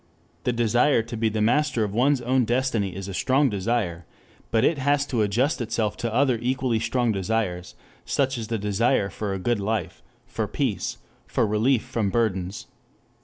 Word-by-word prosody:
The 125 - +2
desire 120 +2 +3
to 115 +1 -7
be 110 0 +1
the 110 0 -1
master 145 0 +2
of 100 -2 -3
one's 130 +4 +2
own 125 +1 +2
destiny 115 -5 0
is 95 0 -6
a 95 - -5
strong 135 +6 +2
desire, 95 -5 -2 0.4
but 110 -1 +2
it 160 - +2
has 145 +1 +2
to 120 -6 -1
adjust 120 +8 +1
itself 110 -2 -1
to 115 - -2
other 125 0 +2
equally 125 -2 0
strong 120 +1 +1
desires, 95 -3 -2 0.3
such 135 -1 0
as 110 - -5
the 115 0 -1
desire 105 +1 +1
for 105 -2 -4
a 95 - -2
good 110 +4 0
life, 110 +2 -2 0.2
for - - -3
peace, - - -2 0.3
for - - +1
relief 110 +4 +2
from 110 -4 -1
burdens. 95 -4 -1
115 Hz, 175 wpm, -25 LUFS, 105-125 Hz, 0.4 s, desire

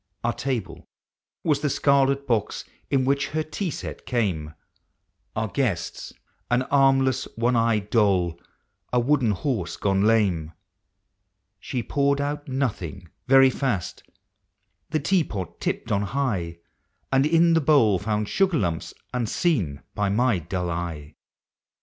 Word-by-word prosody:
47 - - 0
Our 120 - +1
table 115 -6 -4 0.6
was 150 -4 +2
the 150 - +1
scarlet 140 0 +2
box 115 -6 -1 0.2
in 130 -2 +2
which 140 +1 +1
her 155 +1 -2
tea 175 +4 -3
set - - -7
came; 90 -11 -1 0.8
Our 110 0 -1
guests, 100 -9 -2 0.4
au 120 +1 +3
armless 135 -1 +3
one 120 +2 +1
eyed 115 -3 +1
doll, 95 -7 +2 0.5
a 125 - +3
wooden 130 -1 +2
horse 100 - -2
gone 95 -1 +1
lame. 95 -8 +2 1.1
She 125 -2 -3
poured 140 +4 +1
out 145 +1 -3
nothing, 105 - -3 0.2
very 135 0 +7
fast 125 - -2 0.5
— - - -50
the 155 - 0
tea 175 +4 +2
pot 95 - -6
tipped - - -2
on 100 - +2
high, 100 -7 -2 0.3
— - - -47
And 135 0 +4
in 165 +1 +4
the 165 - +3
bowl 135 - +4
found 105 0 -1
sugar 190 - +2
lumps 85 - -2 0.2
unseen 115 - 0
by 105 -1 0
my 115 -1 +2
dull 90 +2 -3 0.2
eve. 75 -1 -11
120 Hz, 140 wpm, -24 LUFS, 95-140 Hz, 1.1 s, very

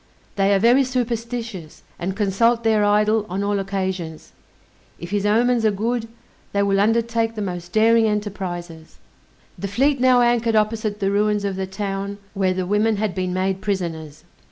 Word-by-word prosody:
They 195 0 +2
are 200 - +4
very 240 +7 +4
superstitious, 235 -7 -4 0.2
and 190 +2 -3
consult 230 +3 +2
their 220 -2 +3
idol 210 +1 +3
on 190 +3 -2
all 205 0 0
occasions. 190 -4 -4 0.7
If 170 +1 -9
his 205 0 0
omens 235 +2 +2
are 220 - +4
good, 225 +3 -2 0.5
they 200 0 +2
will 195 -1 +2
undertake 225 +1 +1
the 215 - -4
most 175 -2 -5
daring 225 +1 +4
enterprizes. 180 -6 -4 0.6
The 200 - -3
fleet 270 +7 +1
now 255 -1 +5
anchored 240 -1 +2
opposite 215 -1 0
the 195 0 +1
ruins 210 0 +1
of 195 -1 -2
the 190 0 -3
town 195 +1 -4 0.2
where 190 -2 0
the 185 -1 -2
women 210 +3 +2
had 210 -2 -1
been 185 -1 -2
made 190 +1 -1
prisoners. 165 -7 -4
205 Hz, 165 wpm, -21 LUFS, 190-225 Hz, 0.7 s, now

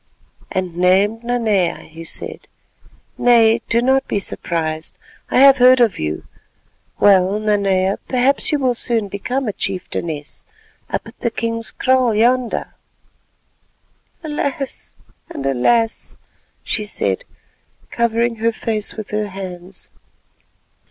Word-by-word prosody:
"And 185 -2 -3
named 195 +5 +2
Nanea," 220 -7 0
he 165 +1 -10
said. - - -7 0.7
"Nay, 230 -2 +5
do 235 +1 +2
not 265 +1 +2
be - - -1
surprised, 160 -4 -2 0.3
I - - +1
have 275 0 +8
heard 255 +1 +7
of 230 -5 +2
you. 75 0 -3 0.7
Well, 195 0 +4
Nanea, 200 -3 +1
perhaps 260 +2 +2
you 300 - +2
will 260 -3 +1
soon 230 -3 0
become 245 +7 -3
a 210 - -1
chieftainess—up 170 -6 -6
at - - -14
the 235 - 0
king's 230 0 -2
kraal 255 -3 +2
yonder." 245 +2 +1 1.5
"Alas! 285 -3 -4 0.3
and 135 - -6
alas!" 225 - +1 0.5
she 215 - -2
said, 210 - 0 0.7
covering 235 0 0
her 230 +1 +1
face 220 -1 -2
with 215 -2 -7
her 210 0 -1
hands. 185 -1 -8
220 Hz, 115 wpm, -19 LUFS, 190-240 Hz, 1.5 s, have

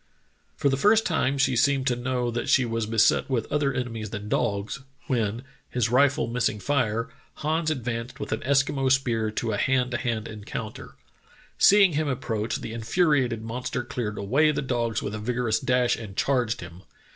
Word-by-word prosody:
"For - - +1
the 135 - +1
first 220 +2 +5
time 140 -5 +1
she 135 -1 +2
seemed 135 +2 +2
to 125 -2 +2
know 125 0 -1
that 120 - -3
she 130 - +4
was 115 -2 -2
beset 115 +3 +3
with 120 -4 0
other 145 -1 +1
enemies 115 -5 -4
than 105 0 -6
dogs, 100 +4 -1 0.3
when, 120 -5 -1 0.3
his 120 -2 0
rifle 135 +2 +3
miss 120 +1 0
ing 105 - -7
fire, 115 -3 0 0.3
Hans 155 +1 -1
advanced 120 -4 -4
with - - -5
an 110 - 0
Eskimo 135 0 +1
spear 120 -5 +1
to 110 +1 -2
a 105 - -1
hand 130 +1 +1
to 120 - 0
hand 115 -4 -2
encounter. 110 0 -7 0.6
Seeing 195 -3 +6
him 155 +1 0
approach, 115 -4 -2
the 110 - -6
in 115 - -5
furiated 130 -4 +1
monster 120 +2 -4
cleared 115 -4 -4
away 135 +10 +2
the 150 - -2
dogs 120 -4 -1
with 105 - -4
a 110 - -4
vigorous 115 0 0
dash 125 -1 +2
and 100 -4 -9
charged 125 -4 +1
him. 90 0 -10
120 Hz, 185 wpm, -26 LUFS, 110-135 Hz, 0.6 s, Seeing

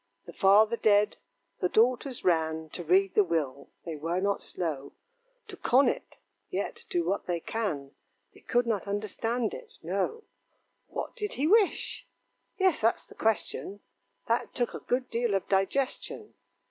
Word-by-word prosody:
The - - -10
father 210 +4 +5
dead, 210 -1 +3 0.4
the 180 - +1
daughters 250 +4 +2
ran 160 -2 +1
To 175 - -5
read 190 +4 +3
the 210 - +5
will 145 -6 -2 0.2
they 165 -2 -4
were 165 +4 -1
not 200 +1 0
slow 150 -6 -3 0.5
To - - -8
con 265 +3 +4
it; - - -3 0.3
yet, - - -4
do 350 -2 0
what 200 - -1
they 175 -1 0
can, 160 -10 -3 0.4
They - - -17
could 245 0 +1
not 215 -4 -1
understand 215 +3 -1
it - - -9
no. 200 - -1 0.6
What - - -5
did 420 -1 -3
he 275 - -1
wish? 410 +3 +2 0.5
yes, 375 -5 +3
that's 225 +1 +2
the - - -15
question 205 -2 -1 0.5
That 230 +1 0
took 240 -2 0
a - - -5
good 250 +1 -1
deal 235 -4 0
of 195 - -1
digestion. 260 - -1
205 Hz, 155 wpm, -29 LUFS, 175-245 Hz, 0.6 s, father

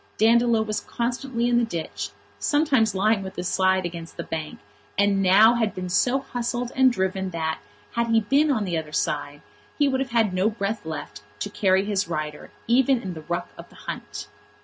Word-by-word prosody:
Dandolo 230 0 +4
was 215 -1 -2
constantly 240 +1 -2
in 240 0 +3
the - - +2
ditch, 170 -8 -4 0.3
sometimes 270 -9 +2
lying 210 +2 +2
with 190 0 -7
his 180 0 -3
side 190 -1 +2
against 170 -1 -7
the - - -3
bank, 155 -1 -5 0.4
and 200 -1 +3
had 185 0 +4 0.3
now 225 - +3
been 185 -3 -5
so 245 +8 +3
hustled 245 -1 -3
and 260 -1 +5
driven 190 -3 -1
that, 160 -2 -2 0.3
had 235 0 0
he 225 -1 +3
been 280 +8 +3
on 225 -7 +1
the 175 -3 -2
other 155 -1 -8
side, 145 -1 -2 0.3
he 290 - +3
would 265 -1 +1
have 265 -1 -2
had 225 -5 +2
no 185 +3 +2
breath 210 -4 -3
left 160 -8 -6 0.2
to - - -3
carry 190 -1 +2
his 205 -3 0
rider, 155 -2 -4 0.2
even 260 +2 +3
in 190 -5 -5
the 160 - -8
ruck 175 +3 -3
of - - -10
the - - -19
hunt. 105 0 -7
205 Hz, 195 wpm, -24 LUFS, 180-235 Hz, 0.4 s, and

